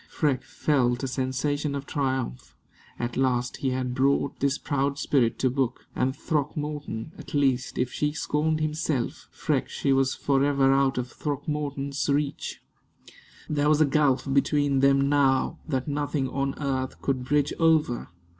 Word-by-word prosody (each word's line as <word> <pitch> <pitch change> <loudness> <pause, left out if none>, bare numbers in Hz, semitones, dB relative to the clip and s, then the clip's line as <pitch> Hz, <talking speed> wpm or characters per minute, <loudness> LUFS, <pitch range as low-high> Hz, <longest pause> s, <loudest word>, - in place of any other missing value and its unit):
Freke 145 -5 0
felt 125 -4 +1
a - - 0
sensation 140 +3 -1
of 140 0 -4
triumph. 130 - -2 0.4
At 120 0 -3
last 125 -2 +1
he 135 - -1
had 130 -1 -2
brought 140 +2 +1
this 140 +1 +1
proud 140 -1 -1
spirit 125 -5 +1
to 130 - +1
book; 130 -2 -1
and 130 +1 0
Throckmorton 150 -5 -3
at - - -8
least 135 -3 +1
if 125 0 -1
she 150 0 0
scorned 155 +1 0
himself, 155 -4 -2
Freke - - -1
she 135 - 0
was 135 -1 +2
forever 140 -1 +3
out 135 -1 +2
of 125 -1 -3
Throckmorton's 145 -1 -3
reach. 140 0 -1 0.8
There 150 0 +1
was 155 -1 +4
a 155 - +6
gulf 140 -2 +2
between 140 0 +2
them 140 0 +4
now 140 -2 +2
that 130 -3 -1
nothing 145 -1 -1
on 135 0 -1
earth 130 -3 -2
could 130 -2 0
bridge 145 +2 +1
over. 160 -7 +2
140 Hz, 150 wpm, -26 LUFS, 130-145 Hz, 0.8 s, a